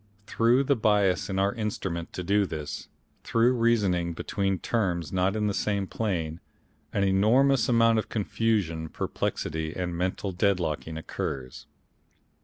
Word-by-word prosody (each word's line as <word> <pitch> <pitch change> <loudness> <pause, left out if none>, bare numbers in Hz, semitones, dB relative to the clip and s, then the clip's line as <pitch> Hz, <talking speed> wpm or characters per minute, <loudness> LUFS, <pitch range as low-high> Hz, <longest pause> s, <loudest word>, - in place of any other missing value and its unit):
Through 120 +5 +3
the 140 +1 +2
bias 105 -5 +2
in 95 - -2
our 100 +1 +2
Instrument 95 -6 -3
to 90 - -4
do 100 +2 +2
this, 75 -3 -6 0.4
through 115 +2 +3
reasoning 100 -8 +2
between 95 +3 -1
terms 85 -5 -1
not 95 +2 +1
in 105 -1 0
the 105 - 0
same 100 0 0
plane, 85 -7 -2 0.5
an 100 - 0
enormous 115 +8 +3
amount 115 -1 +4
of - - -4
confusion, 100 -7 -1
perplexity 80 +1 -3
and 90 -1 -3
mental 95 +3 -2
deadlocking 85 -5 0
occurs. 65 -5 -5
95 Hz, 135 wpm, -27 LUFS, 85-110 Hz, 0.5 s, amount